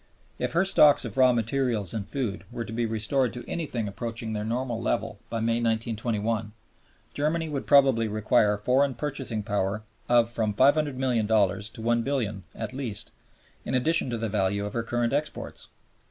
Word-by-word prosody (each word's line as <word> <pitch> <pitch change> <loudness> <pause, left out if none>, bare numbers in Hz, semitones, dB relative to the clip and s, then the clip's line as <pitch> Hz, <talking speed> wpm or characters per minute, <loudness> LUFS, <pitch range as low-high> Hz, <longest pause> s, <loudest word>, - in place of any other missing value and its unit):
If - - -2
her 170 +3 +3
stocks 150 -8 +6
of 110 - -6
raw 130 -1 +6
materials 115 -4 0
and 105 -3 -4
food 125 -8 -3
were 120 -1 -4
to 110 - -7
be 115 0 0
restored 115 +4 +1
to 120 - -8
anything 130 -10 -3
approaching 115 +2 -4
their 105 -1 -2
normal 120 +1 -2
level 115 -3 -2
by 115 -1 -2
May, 115 +1 +1
1921, 115 -1 -1 0.6
Germany 160 +3 0
would 140 -3 -4
probably 135 -5 +5
require 105 0 +2
foreign 130 +5 +2
purchasing 135 -5 -3
power 100 +1 -1 0.3
of 120 -1 +5
from 110 -3 -1
$500,000,000 120 -8 +2
to 115 - -9
$1,000,000,000 115 -3 0
at 110 +2 -5
least, 120 -7 -3 0.5
in - - -2
addition 155 +2 +2
to 120 - -2
the 115 0 -2
value 100 -1 0
of 105 - -5
her 115 - 0
current 120 +1 -1
exports. 150 +2 -3
115 Hz, 165 wpm, -27 LUFS, 110-130 Hz, 0.6 s, stocks